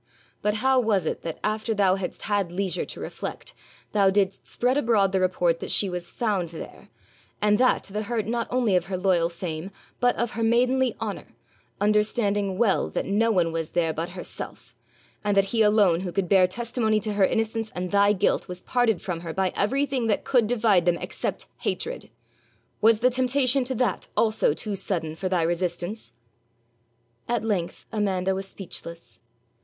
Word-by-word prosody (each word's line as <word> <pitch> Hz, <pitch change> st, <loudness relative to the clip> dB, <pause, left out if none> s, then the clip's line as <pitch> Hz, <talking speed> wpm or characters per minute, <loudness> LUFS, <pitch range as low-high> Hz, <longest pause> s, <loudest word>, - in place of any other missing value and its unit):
But 210 Hz, 0 st, +1 dB
how 265 Hz, -1 st, +5 dB
was 210 Hz, -7 st, +1 dB
it -, -, -2 dB
that, 165 Hz, -2 st, -5 dB
after 215 Hz, +1 st, -1 dB
thou 195 Hz, -2 st, +4 dB
hadst 190 Hz, -2 st, -4 dB
had 200 Hz, -4 st, 0 dB
leisure 185 Hz, 0 st, -1 dB
to -, -, -8 dB
reflect, -, -, -6 dB, 0.4 s
thou 200 Hz, -2 st, +4 dB
didst 195 Hz, 0 st, 0 dB
spread 250 Hz, +2 st, +1 dB
abroad 225 Hz, -8 st, +3 dB
the 190 Hz, -, +1 dB
report 180 Hz, -2 st, +1 dB
that -, -, -5 dB
she 195 Hz, -3 st, +3 dB
was 175 Hz, -1 st, -4 dB
found 200 Hz, -7 st, -1 dB
there, 165 Hz, -, -10 dB, 0.5 s
and 210 Hz, 0 st, +3 dB
that 255 Hz, 0 st, +3 dB
to 195 Hz, -, -9 dB
the 210 Hz, -, -1 dB
hurt 220 Hz, 0 st, -2 dB
not 235 Hz, +2 st, -1 dB
only 240 Hz, -6 st, +2 dB
of 180 Hz, -1 st, +2 dB
her 190 Hz, 0 st, -3 dB
loyal 180 Hz, -3 st, +2 dB
fame, 170 Hz, 0 st, -5 dB, 0.3 s
but 245 Hz, 0 st, +3 dB
of 235 Hz, -1 st, -1 dB
her 230 Hz, -, -4 dB
maidenly 250 Hz, +3 st, +2 dB
honour, -, -, -4 dB, 0.5 s
understanding 205 Hz, -2 st, +1 dB
well 215 Hz, -3 st, +2 dB
that -, -, -2 dB
no 215 Hz, +4 st, +2 dB
one 180 Hz, -6 st, +2 dB
was 165 Hz, -1 st, -3 dB
there 165 Hz, -2 st, 0 dB
but 165 Hz, +2 st, -3 dB
herself, 180 Hz, -, -7 dB, 0.5 s
and 205 Hz, -1 st, +1 dB
that 195 Hz, -, +5 dB
he 225 Hz, -, +3 dB
alone 210 Hz, -5 st, +4 dB
who 180 Hz, -1 st, -4 dB
could 190 Hz, 0 st, -1 dB
bear 185 Hz, 0 st, +5 dB
testimony 220 Hz, +1 st, 0 dB
to 215 Hz, 0 st, -3 dB
her 200 Hz, -1 st, +2 dB
innocence 225 Hz, +1 st, -1 dB
and 180 Hz, 0 st, -3 dB
thy 200 Hz, 0 st, +5 dB
guilt 205 Hz, 0 st, +1 dB
was 180 Hz, 0 st, -7 dB
parted 245 Hz, -6 st, +1 dB
from 175 Hz, -3 st, -3 dB
her 165 Hz, -1 st, -6 dB
by 190 Hz, -1 st, 0 dB
everything 265 Hz, +2 st, 0 dB
that 210 Hz, -, +1 dB
could 245 Hz, -5 st, +2 dB
divide 215 Hz, -7 st, +3 dB
them 175 Hz, -1 st, +3 dB
except -, -, -4 dB
hatred? -, -, -3 dB, 0.7 s
Was 225 Hz, 0 st, +5 dB
the 250 Hz, +1 st, +4 dB
temptation 255 Hz, +1 st, +2 dB
to 260 Hz, +1 st, -2 dB
that 240 Hz, -4 st, -1 dB
also 215 Hz, -9 st, +2 dB
too 210 Hz, -, -3 dB
sudden 165 Hz, -5 st, -2 dB
for 185 Hz, +3 st, -3 dB
thy 180 Hz, -3 st, +1 dB
resistance?' 175 Hz, -, -2 dB, 1.2 s
At 240 Hz, -2 st, 0 dB
length 190 Hz, -6 st, -2 dB
Amanda 190 Hz, -3 st, 0 dB
was 195 Hz, 0 st, -4 dB
speechless. 170 Hz, -3 st, -7 dB
200 Hz, 180 wpm, -25 LUFS, 180-225 Hz, 1.2 s, how